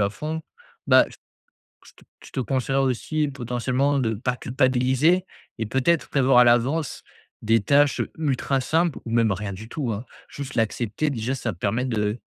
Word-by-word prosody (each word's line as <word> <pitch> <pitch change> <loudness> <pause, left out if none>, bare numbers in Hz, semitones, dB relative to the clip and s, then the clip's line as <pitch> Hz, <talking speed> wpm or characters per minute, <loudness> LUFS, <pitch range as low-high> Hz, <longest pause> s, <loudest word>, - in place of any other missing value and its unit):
à 100 - +3
fond 155 +7 -5 0.4
bah, - - +6
j - - -15 0.7
je - - -15
te - - -21 0.2
je - - -14
te - - -3
conseillerais 135 +2 0
aussi 150 +4 0
potentiellement 130 +2 -1
de 110 -3 0
pas 125 +4 -2
culpabiliser 130 +7 +2 0.3
et 110 - -2
peut-être 130 +8 +1
prévoir 135 -2 +4
à 125 - +8
l'avance 125 +6 +1 0.4
des 110 0 +3
tâches 145 +4 +3 0.2
ultra 135 -3 0
simples 160 +3 0
ou 115 - -5
même 115 -3 +3
rien 100 +1 -3
du 110 +4 -10
tout 135 -4 -3
hein. 110 +5 -6 0.2
Juste 140 -2 -7
l'accepter, 115 +5 -1
déjà 125 -1 -2
ça 120 -4 -3
permet 105 +8 -1
de 110 -2 -1
130 Hz, 170 wpm, -24 LUFS, 115-140 Hz, 0.7 s, à